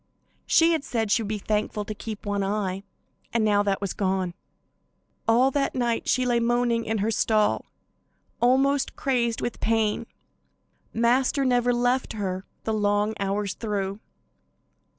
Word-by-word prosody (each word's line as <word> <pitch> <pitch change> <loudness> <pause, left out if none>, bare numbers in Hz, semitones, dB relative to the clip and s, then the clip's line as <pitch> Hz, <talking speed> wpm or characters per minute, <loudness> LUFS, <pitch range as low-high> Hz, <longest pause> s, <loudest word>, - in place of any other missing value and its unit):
She 330 +1 +5
had 320 -4 0
said 225 -6 -2
she 230 - +3
would 215 - -4
be 215 +1 -2
thankful 210 0 -2
to 215 - -4
keep 215 0 -7
one 205 -1 -1
eye, 195 -1 -2 0.5
and 230 -2 +1
now 205 -1 +3
that 200 -1 0
was 200 -3 -2
gone. 190 -2 -1 0.9
All 245 +4 +4
that 275 0 0
night 240 -2 0
she 255 0 +2
lay 240 -1 +2
moaning 235 0 +1
in 220 0 -1
her 225 - +1
stall, 215 -1 +1 0.7
almost 270 +3 +2
crazed 235 -4 0
with 240 - -3
pain. 220 -2 0 0.8
Master 250 +4 +2
never 245 -1 +3
left 245 +1 +1
her 190 -2 -3 0.2
the 220 - -1
long 205 0 +1
hours 200 0 -1
through. 200 -2 -3
225 Hz, 150 wpm, -25 LUFS, 205-245 Hz, 0.9 s, She